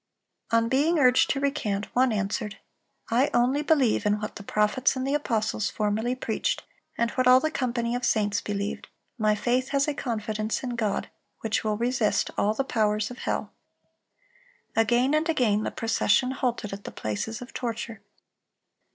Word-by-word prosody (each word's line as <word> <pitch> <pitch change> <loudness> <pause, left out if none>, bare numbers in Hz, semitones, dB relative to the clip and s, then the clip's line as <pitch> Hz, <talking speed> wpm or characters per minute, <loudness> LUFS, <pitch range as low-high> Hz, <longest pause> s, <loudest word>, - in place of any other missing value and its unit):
On 230 0 +3
being 295 +7 +2
urged 255 -3 +5
to 275 - +1
recant, 220 -8 -1
one 255 0 +4
answered: 210 0 -2 0.5
"I 255 +5 +3
only 255 +4 +3
believe 280 -9 +2
in 210 0 +1
what 215 - -5
the - - -7
prophets 210 +7 +1
and 260 0 -2
the 275 - 0
apostles 220 -7 0
formerly 220 +4 -1
preached, 255 - -2 0.3
and 235 0 +1
what 255 -1 +1
all 255 0 +8
the 315 +3 -1
company 235 -4 -1
of 245 +1 -2
saints 205 -4 +1
believed. 205 0 -4 0.3
My 215 -1 +3
faith 250 +4 0
has 280 0 +1
a 295 - 0
confidence 215 -4 -3
in 250 - -3
God 220 -4 -2 0.3
which 220 -1 -1
will 215 -1 0
resist 235 -2 +1
all 210 +2 +1
the 270 - 0
powers 215 -3 0
of 250 - -9
hell."(342) - - -6
Again 245 +5 +2
and 310 +2 +1
again 230 -9 +2
the - - -1
procession 225 +2 +1
halted 240 -6 -2
at 200 0 -7
the - - -6
places 110 - -4
of 245 - -10
torture. 230 -3 -4
235 Hz, 170 wpm, -26 LUFS, 215-260 Hz, 0.5 s, all